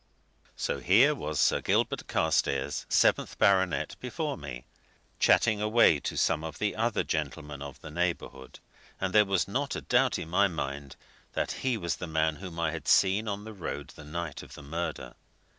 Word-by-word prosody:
So - - -2
here 120 +12 +5
was 75 - -4
Sir - - +3
Gilbert - - 0
Carstairs, 75 -3 0
seventh - - +2
baronet, 95 -2 +2
before - - -3
me, - - -8 0.5
chatting 110 -3 +4
away 110 -7 +4
to - - -4
some 80 -2 +1
of 80 -1 -6
the 105 - -1
other 115 0 0
gentlemen 75 -2 -4
of 70 -1 -8
the 75 - -9
neighbourhood, 80 -6 -3 0.4
and 95 -1 -2
there 105 -1 +6
was 95 -3 +1
not 135 +7 -2
a - - -4
doubt 125 +1 +2
in 80 - -6
my 100 +4 +3
mind 70 -5 -5 0.4
that - - -1
he 130 -3 -1
was 85 -5 -2
the 90 - -5
man 80 -1 0
whom 90 -3 -8
I 85 -2 +1
had 80 -1 -7
seen 100 +3 +4
on 100 0 -3
the 110 0 -8
road 95 -5 -6
the 75 - -12
night 80 0 -5
of - - -12
the 75 - -11
murder. 85 +5 -4
85 Hz, 180 wpm, -29 LUFS, 75-105 Hz, 0.5 s, there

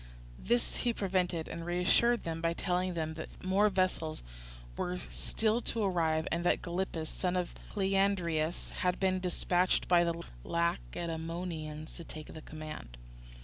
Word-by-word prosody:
This 240 0 +1
he 240 -2 +1
prevented, 180 -5 0
and 165 0 -5
reassured 180 +7 +3
them 165 -1 -3
by 165 0 +2
telling 180 0 0
them 160 -1 -1
that 160 0 -8
more 195 +3 +4
vessels 185 -5 0 0.5
were 180 0 -1
still 220 +2 +1
to 225 -1 -1
arrive, 160 -4 +2
and 170 +1 0
that 175 - +2
Gylippus, 175 -2 -2
son 180 +2 -1
of 180 -1 -1 0.2
Cleandridas, 190 -5 +1
had 180 0 +1
been 185 -1 +2
dispatched 180 0 +2
by 175 -1 +6
the 170 0 -1 0.2
Lacedaemonians 165 -2 -2
to 170 - -8
take 155 -1 -8
the 155 - -8
command. 155 - -8
175 Hz, 145 wpm, -33 LUFS, 160-185 Hz, 0.5 s, by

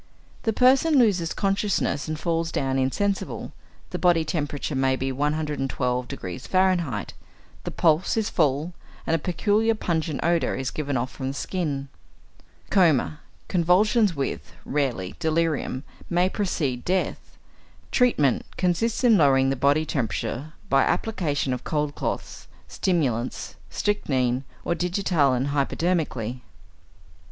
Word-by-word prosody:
= - - -28
The - - +4
person 265 +6 +4
loses 190 -9 +3
consciousness 195 -7 0
and 155 0 -3
falls 165 0 -1
down 135 -1 0
insensible; 195 +10 -1 0.4
the 180 - -3
body 170 -2 +3
temperature 150 -2 -2
may 130 0 +2
be 135 0 -2
112° 135 - -2
F., 175 - +2 0.6
the - - -3
pulse 165 +5 +2
is 220 -1 +1
full, 155 0 +1 0.3
and 165 - +2
a - - 0
peculiar 210 +7 +1
pungent 160 -7 -1
odour 170 0 +1
is 130 -1 -3
given 145 -3 -2
off 125 +2 -2
from 130 - -5
the 135 - -2
skin. 145 -6 -2 0.8
Coma, 160 -6 +3 0.3
convulsions 190 +3 +3
with 140 -1 -4
(rarely) 130 -11 -1
delirium, 160 -4 0 0.3
may 180 +1 +2
precede 145 - -1
death. 185 +1 -2 0.5
Treatment 150 - +3
consists 200 +7 0
in 230 -4 +6
lowering 135 -2 +4
the - - 0
body 140 +4 +2
temperature 135 +2 -3
by 135 0 +4
application 150 -11 0
of 125 - -5
cold 150 -2 -1
cloths, - - -4 0.2
stimulants, 130 -10 -1 0.2
strychnine 135 -11 0 0.2
or - - +1
digitalin 165 -7 +1
hypodermically. 140 -4 -1
XXIII. - - -31
155 Hz, 125 wpm, -25 LUFS, 135-180 Hz, 0.8 s, in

